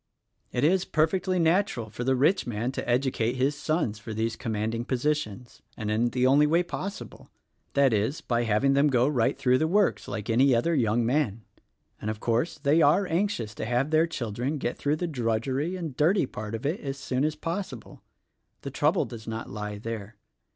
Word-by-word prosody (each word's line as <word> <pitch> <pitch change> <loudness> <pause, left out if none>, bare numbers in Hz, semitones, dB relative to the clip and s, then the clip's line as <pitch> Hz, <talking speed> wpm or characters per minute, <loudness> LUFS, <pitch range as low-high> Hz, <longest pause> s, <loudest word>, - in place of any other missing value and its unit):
"It 125 - -1
is 180 +4 +3
perfectly 185 +4 +1
natural 165 - +1
for 120 - -5
the 130 +1 +2
rich 150 +8 +2
man 120 +2 -2
to 135 - -5
educate 120 -2 +1
his 135 +3 +1
sons 150 -8 -1
for 105 +1 -7
these 110 +1 -1
commanding 110 +1 -2
positions 130 -3 -2
— 115 - -34
and 105 -2 -3
in 115 +3 +2
the 125 +1 0
only 140 +3 +5
way 170 +4 +3
possible; 195 +3 -7 0.4
that 140 -3 +4
is, 110 +8 0
by 120 -1 -1
having 115 +6 +2
them 140 +2 +4
go 125 -2 +3
right 130 -6 +1
through 130 -2 +3
the 160 - +2
works 200 +3 +1
like 105 -1 -5
any 125 +3 +4
other 145 +9 +1
young 120 -4 +2
man. 120 -4 0 0.6
And, 105 - -3
of 110 -1 -4
course, 120 +10 0
they 150 +2 +3
are 155 +7 +4
anxious 165 - -1
to - - -5
have 125 +6 0
their 160 +1 +4
children 125 0 -3
get 125 -3 -2
through 145 +1 0
the 175 - -3
drudgery 130 +4 -1
and 165 -7 -5
dirty 165 +6 +3
part 110 -3 -6
of 115 - -7
it 155 +7 0
as 135 -1 -5
soon 130 -1 -2
as 155 0 0
possible. 165 - -6 0.6
The - - -6
trouble - - +2
does 110 -2 -10
not 115 0 -5
lie 105 0 -5
there. 110 -1 -6
130 Hz, 195 wpm, -27 LUFS, 115-155 Hz, 0.6 s, only